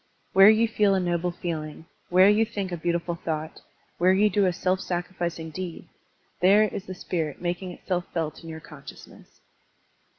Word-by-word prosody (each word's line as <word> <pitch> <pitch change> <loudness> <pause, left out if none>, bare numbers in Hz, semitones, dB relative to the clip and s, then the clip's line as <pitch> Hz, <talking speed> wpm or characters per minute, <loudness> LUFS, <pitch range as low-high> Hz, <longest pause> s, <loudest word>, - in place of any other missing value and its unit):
Where 195 +2 +8
you 220 +1 +4
feel 210 -3 +2
a - - +2
noble 175 -1 0
feeling, 160 -3 -5 0.2
where 185 +2 +6
you 210 +2 +4
think 205 -4 -4
a - - -1
beautiful 170 +1 -1
thought, 160 -2 -5 0.4
where 180 +2 +5
you 205 +2 +3
do 200 0 +3
a - - +2
self 185 +2 -1
sacrificing 175 -2 -4
deed, 180 +1 -7 0.5
there 200 +4 +6
is 205 -2 -3
the 185 - -6
spirit 160 -5 -3
making 180 +1 -3
itself 180 0 -3
felt 160 -1 -3
in 165 - -9
yotu* 160 0 -8
con 150 -2 -12
sciousness. 135 - -14
180 Hz, 175 wpm, -26 LUFS, 165-190 Hz, 0.5 s, Where